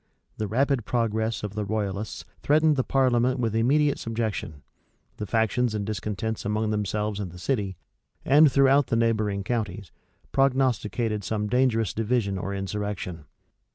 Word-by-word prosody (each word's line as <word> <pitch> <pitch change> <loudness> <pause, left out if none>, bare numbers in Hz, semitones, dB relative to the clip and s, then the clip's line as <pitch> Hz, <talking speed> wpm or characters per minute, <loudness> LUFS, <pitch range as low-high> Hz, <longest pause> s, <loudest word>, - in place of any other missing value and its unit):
The 110 - -2
rapid 135 +3 +1
progress 110 -1 -1
of 105 -1 -4
the 105 0 -2
royalists 100 -1 -3 0.2
threatened 155 +1 +3
the 130 - +1
parliament 130 -1 +2
with 115 -3 -1
immediate 140 +6 +2
subjection: 110 -10 -3 0.5
the 105 - -5
factions 115 +1 +1
and 100 -1 -2
discontents 110 +2 -3
among 105 +1 -1
themselves 105 0 -1
in 100 -3 -4
the 90 - -12
city, 100 -3 -2 0.5
and 145 +1 +6
throughout 140 0 +4
the - - 0
neighboring 110 -4 +1
counties, 105 -6 -3 0.4
prognosticated 120 -5 +1
some 105 +1 -2
dangerous 115 -4 +1
division 110 -3 0
or 100 - -4
insurrection. 95 -4 -4
110 Hz, 140 wpm, -26 LUFS, 105-125 Hz, 0.5 s, and